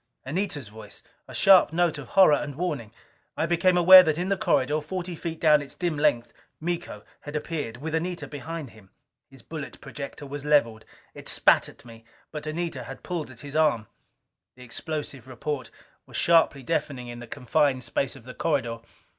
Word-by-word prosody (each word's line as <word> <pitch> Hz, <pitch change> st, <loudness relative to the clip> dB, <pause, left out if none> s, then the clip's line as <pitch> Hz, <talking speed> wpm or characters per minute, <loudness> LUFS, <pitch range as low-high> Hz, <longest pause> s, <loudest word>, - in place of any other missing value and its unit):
Anita's 145 Hz, -, -3 dB
voice! 105 Hz, -1 st, -12 dB, 0.2 s
A -, -, -10 dB
sharp 190 Hz, -5 st, +6 dB
note 165 Hz, -2 st, +1 dB
of 135 Hz, -, -9 dB
horror 190 Hz, -6 st, +8 dB
and 145 Hz, -1 st, -1 dB
warning. 145 Hz, -10 st, -3 dB, 0.5 s
I -, -, +1 dB
became 175 Hz, +2 st, +2 dB
aware 185 Hz, +2 st, +10 dB
that 155 Hz, -4 st, 0 dB
in 180 Hz, +2 st, -2 dB
the 195 Hz, -, +2 dB
corridor, 150 Hz, -3 st, +1 dB
forty 175 Hz, +3 st, -5 dB
feet 165 Hz, 0 st, -5 dB
down 150 Hz, -2 st, +5 dB
its 140 Hz, -, -9 dB
dim 175 Hz, -3 st, -1 dB
length, 145 Hz, -5 st, +1 dB, 0.3 s
Miko 170 Hz, -10 st, -4 dB, 0.2 s
had 145 Hz, +1 st, -9 dB
appeared 150 Hz, -7 st, -4 dB
with 155 Hz, +4 st, -5 dB
Anita 175 Hz, +2 st, -2 dB
behind 150 Hz, -1 st, -7 dB
him. 105 Hz, -3 st, -18 dB, 0.4 s
His 135 Hz, -3 st, -17 dB
bullet 155 Hz, -3 st, -8 dB
projector 145 Hz, +1 st, -8 dB
was 140 Hz, 0 st, -7 dB
leveled. 115 Hz, -7 st, +2 dB, 0.3 s
It -, -, -11 dB
spat -, -, +3 dB
at -, -, -17 dB
me. 115 Hz, -1 st, -13 dB, 0.3 s
But 150 Hz, -1 st, -6 dB
Anita 155 Hz, -5 st, -3 dB
had 135 Hz, -, -10 dB
pulled 170 Hz, -5 st, -4 dB
at 120 Hz, -2 st, -13 dB
his 145 Hz, 0 st, -9 dB
arm. 150 Hz, -8 st, +2 dB, 0.7 s
The 125 Hz, -, -13 dB
explosive 140 Hz, 0 st, -6 dB
report 130 Hz, 0 st, -4 dB, 0.4 s
was -, -, -6 dB
sharply 165 Hz, -5 st, +3 dB
deafening 140 Hz, -4 st, -2 dB
in 120 Hz, 0 st, -8 dB
the 120 Hz, -, -9 dB
confined 130 Hz, +2 st, 0 dB
space 130 Hz, +4 st, -2 dB
of 135 Hz, -, -13 dB
the 125 Hz, +1 st, -10 dB
corridor. 120 Hz, -8 st, -1 dB
150 Hz, 180 wpm, -26 LUFS, 125-165 Hz, 0.7 s, aware